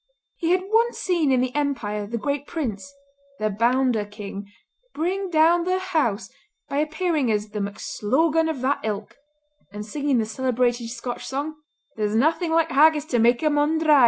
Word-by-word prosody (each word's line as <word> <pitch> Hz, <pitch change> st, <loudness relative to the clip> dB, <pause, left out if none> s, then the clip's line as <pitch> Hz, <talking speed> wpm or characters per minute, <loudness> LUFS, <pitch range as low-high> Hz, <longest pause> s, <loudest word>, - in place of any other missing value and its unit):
He 330 Hz, -, -1 dB
had 365 Hz, +1 st, +3 dB
once 460 Hz, +3 st, +2 dB
seen 340 Hz, -7 st, +1 dB
in 255 Hz, -1 st, +3 dB
the 255 Hz, 0 st, -1 dB
Empire 220 Hz, -8 st, -2 dB
the 235 Hz, +3 st, -3 dB
Great 285 Hz, +4 st, -2 dB
Prince—"The 280 Hz, -1 st, -5 dB
Bounder 240 Hz, +1 st, +2 dB
King"—bring 230 Hz, -, -6 dB
down 335 Hz, +1 st, +4 dB
the 370 Hz, +1 st, +1 dB
house 295 Hz, -, -1 dB, 0.4 s
by 280 Hz, -, -3 dB
appearing 310 Hz, -3 st, 0 dB
as 210 Hz, 0 st, -1 dB
"The 210 Hz, 0 st, -5 dB
MacSlogan 300 Hz, +11 st, 0 dB
of 295 Hz, -6 st, -3 dB
that 270 Hz, +2 st, +1 dB
Ilk," 210 Hz, -1 st, -4 dB, 0.6 s
and 210 Hz, +1 st, -7 dB
singing 280 Hz, +3 st, 0 dB
the 225 Hz, -, +1 dB
celebrated 240 Hz, 0 st, 0 dB
Scotch 245 Hz, 0 st, -6 dB
song, 285 Hz, +4 st, -3 dB, 0.4 s
"There's 210 Hz, 0 st, 0 dB
naething 320 Hz, +7 st, +2 dB
like 325 Hz, 0 st, +2 dB
haggis 300 Hz, +1 st, +5 dB
to 240 Hz, -, +3 dB
mak 235 Hz, +4 st, +3 dB
a 305 Hz, -, +3 dB
mon 295 Hz, +2 st, +2 dB
dry!" 310 Hz, -3 st, +5 dB
280 Hz, 160 wpm, -24 LUFS, 225-320 Hz, 0.6 s, haggis